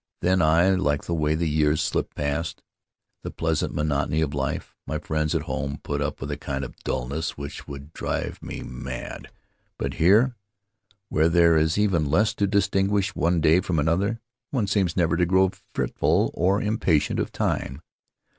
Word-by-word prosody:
Then 95 +1 +3
I 85 +4 +4
like 75 -7 +1
the 85 - -2
way 75 -1 +1
the 85 +1 0
years 75 0 +2
slip 75 -2 -1
past 75 +3 -2 0.3
— - - -56
the - - -4
pleasant 80 -2 -1
monotony 75 +1 0
of 75 -2 -1
life. 70 -1 -3
My 75 +3 -2
friends 75 0 -1
at - - 0
home 70 +1 -3
put 70 0 -2
up 75 - -2
with 70 +2 -5
a 70 - -3
kind 70 -2 -4
of - - -10
dullness 70 +7 -3
which 70 +1 -7
would 70 +2 -9
drive - - -3
me - - -6
mad; 65 0 -7 0.5
but - - -3
here, 110 +9 +5 0.8
where 80 +1 +3
there 85 -1 +5
is 80 +2 +2
even 90 -8 +2
less 105 +9 +3
to 100 - 0
dis 100 -2 +2
tinguish 100 0 +1
one 85 -3 +1
day 80 +3 +5
from 90 -3 -2
another, 90 +9 +1 0.3
one 125 -7 0
seems 95 -4 0
never 85 -1 +2
to 90 - +3
grow 95 +1 +4 0.2
fretful - - +1
or 95 +3 +2
impatient 90 -8 +1
of - - -2
time. 65 +4 -2
80 Hz, 180 wpm, -25 LUFS, 75-95 Hz, 0.8 s, here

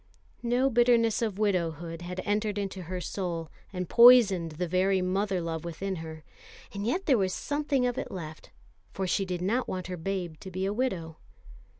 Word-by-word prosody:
The 245 +3 +2
bitterness 235 -2 +3
of 215 -4 -1
widowhood 170 -5 -1
had 180 +1 -5
entered 210 0 0
into 195 -2 -3
her 180 +1 -5
soul, 170 -3 -4 0.2
and 180 -2 -4
poisoned 210 -9 +7
the 175 +3 -3
very 185 +2 +2
mother 190 +1 0
love 165 -2 -4
within 185 +3 -4
her; 160 -1 -8 0.5
and 200 +1 -3
yet 365 +11 -1
there 260 -7 +4
was 190 -1 0
something 290 -3 0
of 245 0 -1
it - - -5
left, 160 -4 -8 0.4
for 190 - -2
she 195 +2 0
did 180 -1 -3
not 235 +7 0
want 185 -1 -4
her 180 0 -5
babe 175 -2 -3
to 190 - -8
be 185 +1 -3
a 200 - -1
widow. 185 -10 -2
190 Hz, 185 wpm, -28 LUFS, 175-215 Hz, 0.5 s, poisoned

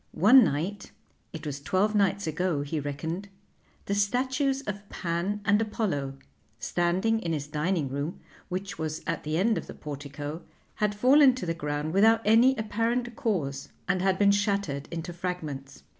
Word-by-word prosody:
One 245 +8 +8
night 185 +5 -2 0.4
it 160 -4 -8
was 140 -1 -4
twelve 195 +7 +1
nights 200 -1 +2
ago 160 -1 -1
he 150 +2 -3
reckoned 160 +7 -4 0.6
the 200 - -1
statues 260 +6 +1
of 205 -3 -6
Pan 175 +5 -2
and 205 +1 +4
Apollo, 180 -11 -2 0.4
standing 185 +6 +1
in 170 -6 -2
his 145 -2 -2
dining 150 +1 -1
room, 140 +5 -4 0.3
which 190 0 -4
was 155 -1 -3
at 165 - -2
the 155 +1 -1
end 215 +5 +2
of - - -10
the - - -9
portico, 145 +2 -6 0.4
had 210 -1 0
fallen 260 +4 +6
to 255 - -5
the 165 - 0
ground 150 0 -3
without 225 +3 +5
any 235 +5 +6
apparent 230 +2 -1
cause 170 - -2 0.2
and 190 -2 +1
had 190 0 +2
been 200 0 +5
shattered 200 -9 0
into 170 +1 -5
fragments. 155 -6 -5
185 Hz, 160 wpm, -28 LUFS, 155-210 Hz, 0.6 s, One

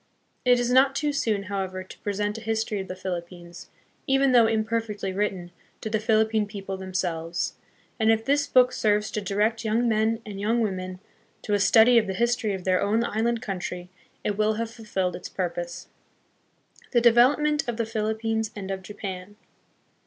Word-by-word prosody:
It 245 -1 +5
is 245 0 0
not 265 +1 +5
too 295 0 0
soon, 215 -7 0
how 200 0 -3
ever, 185 0 -5
to 185 - -14
present 205 +1 -2
a - - -13
history 220 -2 -1
of 190 - -5
the 185 - -6
Philippines, 175 -1 -7 0.4
even 270 0 +3
though 235 -3 +6
imperfectly 220 -3 -1
written, 190 -3 -2 0.3
to 220 - -4
the 220 - +1
Philippine 220 -1 +2
people 195 -2 -6
themselves; 175 -3 -3 0.5
and 220 0 +4
if 225 0 +1
this 285 +1 +2
book 255 -1 +5
serves 210 -2 +1
to 210 - -2
direct 210 +4 0
young 225 +2 +1
men 220 0 +1
and 205 -2 -7
young 220 +4 +1
women 185 -3 -3 0.4
to 210 - -2
a 205 - +3
study 225 +5 +6
of 215 - -2
the 190 - -3
history 235 -1 +1
of 185 - -7
their 185 0 +2
own 220 +3 +2
island 230 +1 -1
coun 195 -3 -3
try, 180 0 -6 0.3
it 205 0 -2
will 215 0 +3
have 225 +1 -3
fulfilled 195 -6 -2
its 180 - -8
purpose. 175 -2 -4 1.1
The 240 - +5
Development 275 +5 +4
of 235 - -3
the 230 - 0
Philippines 220 0 -1
and 195 -2 -5
of 190 0 -4
Japan. 190 0 -7
215 Hz, 180 wpm, -25 LUFS, 190-230 Hz, 1.1 s, though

